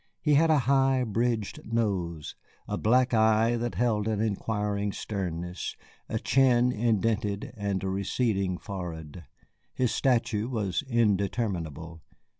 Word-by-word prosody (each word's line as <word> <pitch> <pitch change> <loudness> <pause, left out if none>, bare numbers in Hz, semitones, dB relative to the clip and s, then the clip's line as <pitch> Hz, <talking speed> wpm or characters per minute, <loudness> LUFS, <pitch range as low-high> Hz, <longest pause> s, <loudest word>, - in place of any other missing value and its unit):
He 150 - +2
had 160 +3 +5
a 155 - +5
high 135 -1 +3
bridged 115 -1 -1
nose, 90 -9 -1 0.3
a - - -2
black 125 +3 +2
eye 110 +1 +4
that 120 0 -3
held 110 -3 +1
an 110 -2 0
inquiring 105 -1 -1
sternness, 90 -3 -4 0.3
a - - -1
chin 125 -2 +3
indented, 110 -2 0
and 100 -3 -2
a - - -1
receding 95 -1 0
forehead. 85 -4 -7 0.5
His 125 -2 +1
stature 115 -4 +1
was 105 -8 -1
indeterminable. 95 - -1
110 Hz, 120 wpm, -28 LUFS, 95-120 Hz, 0.5 s, had